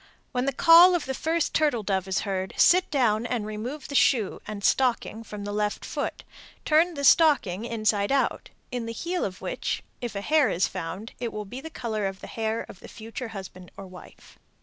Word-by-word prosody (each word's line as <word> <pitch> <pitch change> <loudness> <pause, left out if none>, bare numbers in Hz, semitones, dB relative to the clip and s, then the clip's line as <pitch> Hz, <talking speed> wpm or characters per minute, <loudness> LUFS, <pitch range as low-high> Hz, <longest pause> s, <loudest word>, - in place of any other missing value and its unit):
When 250 0 -1
the 275 - +1
call 340 +5 +7
of 340 - -1
the 265 - -3
first 320 +3 -1
turtle 290 -8 +1
dove 190 -2 -1
is 190 - 0
heard, 190 -2 -3
sit 365 +1 +5
down 235 -5 +1
and 240 -4 -2
remove 230 +7 -6
the - - -8
shoe 235 -7 +2
and 205 -1 -6
stocking 240 -3 +1
from 210 -2 -8
the 205 - -4
left 210 0 -2
foot, - - -4 0.4
turn 325 +3 +3
the 280 - -4
stocking 255 - +4
inside 215 -2 0
out, 275 -1 0 0.2
in 245 -2 -3
the 230 - -4
heel 345 +9 -3
of 185 -2 -5
which - - -3 0.2
if 240 -3 -5
a 200 - -3
hair 300 +4 +3
is 175 - +1
found, 185 +4 -6
it 235 -1 -3
will 210 0 -5
be 245 +6 -8
of 280 - -13
the - - -5
color 220 -8 -3
of 195 0 -6
the - - -9
hair 225 0 -3
of 190 - -12
the - - -12
future 230 +3 -7
husband 190 -4 -9
or 195 - -8
wife. 185 -1 -15
225 Hz, 215 wpm, -26 LUFS, 205-280 Hz, 0.4 s, call